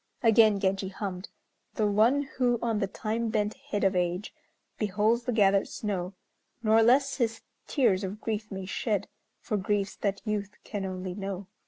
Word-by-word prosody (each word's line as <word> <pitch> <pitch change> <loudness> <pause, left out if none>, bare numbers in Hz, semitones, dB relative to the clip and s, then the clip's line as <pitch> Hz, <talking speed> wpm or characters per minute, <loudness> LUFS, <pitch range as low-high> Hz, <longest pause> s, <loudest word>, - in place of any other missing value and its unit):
Again 220 -2 +6
Genji 195 0 0
hummed: 190 -1 -5 0.5
"The 215 - +1
one 220 +8 +3
who 250 -3 0
on 225 -2 0
the 195 - 0
time 225 +4 -2
bent 210 -1 0 0.2
head 205 -7 -1
of 195 -1 +3
age, 180 +2 -1 0.5
Beholds 215 +3 +1
the 250 - 0
gathered 200 -3 +3
snow, 195 -3 -3 0.5
Nor 220 +1 +5
less 265 +4 +4
his 225 -3 0 0.3
tears 205 -9 +2
of 195 +2 -4
grief 215 -1 -3
may 190 -2 -5
shed, 205 +1 -1 0.3
For 210 - -1
griefs 200 0 -1
that 200 -1 -2
youth 205 -2 -2
can 205 -3 -4
only 185 -1 -4
know." 195 0 -5
210 Hz, 165 wpm, -28 LUFS, 195-225 Hz, 0.5 s, Again